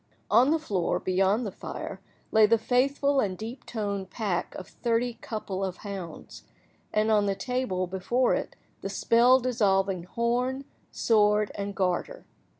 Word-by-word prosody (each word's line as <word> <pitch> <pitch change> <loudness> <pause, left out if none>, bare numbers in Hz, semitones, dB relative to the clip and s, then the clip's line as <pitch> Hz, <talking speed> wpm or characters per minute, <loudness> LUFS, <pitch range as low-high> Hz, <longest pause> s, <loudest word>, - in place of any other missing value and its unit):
On 250 +4 +6
the 320 - +3
floor, 200 - -1
beyond 195 +5 +1
the 205 - -3
fire, - - -7 0.3
lay 220 -1 +6
the 230 +2 +4
faithful 275 +4 +2
and 190 -6 0
deep–toned 215 -4 -5
pack 195 -3 -2
of 185 - -7
thirty 240 0 -1
couple 200 -3 -4
of 185 -1 -3
hounds, 190 -5 -8 0.5
and 215 +1 +2
on 205 -1 +3
the 195 - 0
table, 250 -7 -2
before 190 +8 +1
it, - - -3 0.3
the - - -4
spell–dissolving 230 -7 +3
horn, 245 +6 -1 0.2
sword, 210 -2 +2
and 200 0 -5
garter. 190 - -2
215 Hz, 140 wpm, -27 LUFS, 195-245 Hz, 0.5 s, On